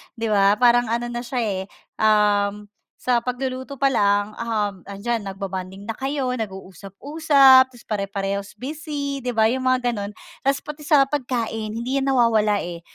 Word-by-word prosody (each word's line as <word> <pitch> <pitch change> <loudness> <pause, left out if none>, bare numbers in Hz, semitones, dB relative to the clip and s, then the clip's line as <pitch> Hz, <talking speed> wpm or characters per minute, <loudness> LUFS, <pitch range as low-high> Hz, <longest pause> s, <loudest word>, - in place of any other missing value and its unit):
’di 230 -1 -3
ba? 200 0 +4
Parang 240 +1 +4
ano 235 +2 -2
na 240 - -3
siya 245 0 -3
eh, 195 -4 -2 0.4
um, 210 -1 +2 0.3
sa 245 -2 +1
pagluluto 260 +2 -4
pa 275 0 +2
lang, 205 -1 +2
um, 210 -4 -2
’andiyan 225 +4 -2
nag-bobonding 195 0 -6
na 225 - -3
kayo, 270 +1 -2
nag-uusap-usap, 260 - +3
tapos 245 -2 -17
pare-parehas 200 -1 -3
busy, 285 0 -4
’di 250 - -3
ba, 220 - +5
'yong 250 +4 +1
mga 250 -2 +1
gano'n. 200 -2 -4 0.3
Tapos 275 +1 +1
pati 300 0 -8
sa 290 -2 +4
pagkain, 230 -6 -3
hindi 260 +4 -1
’yan 270 - 0
nawawala, 225 -5 +3
eh. 170 -1 -7
235 Hz, 160 wpm, -22 LUFS, 205-260 Hz, 0.4 s, ba